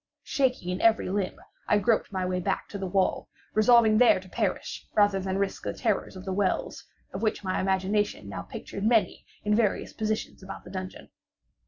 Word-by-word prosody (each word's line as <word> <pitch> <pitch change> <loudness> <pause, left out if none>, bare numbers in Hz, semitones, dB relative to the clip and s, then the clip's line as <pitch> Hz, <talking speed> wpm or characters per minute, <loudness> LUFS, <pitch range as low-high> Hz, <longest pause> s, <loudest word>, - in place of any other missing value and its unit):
Shaking 255 - 0
in 180 +1 -2
every 225 -4 +3
limb, 195 -2 -1 0.3
I 210 - +4
groped 220 +1 +1
my 185 -2 -1
way 180 0 -1
back 190 +2 -2
to 200 - -6
the 190 - -3
wall—resolving 215 +4 +3
there 245 -6 +6
to 185 - -14
perish 205 -1 -3
rather 205 -2 +4
than 190 0 -2
risk 200 0 -1
the - - -3
terrors 215 -4 -1
of 185 0 -9
the 190 - -2
wells, 190 -1 -1 0.3
of 190 - -4
which 220 -2 0
my 185 -1 -1
imagination 190 - 0
now 95 -2 -5
pictured 100 - -7
many 225 0 +2 0.2
in 210 - +1
various 210 -2 +1
positions 215 -1 -3
about 190 +1 -8
the 180 - -11
dungeon. 185 -1 -7
200 Hz, 185 wpm, -27 LUFS, 185-215 Hz, 0.3 s, there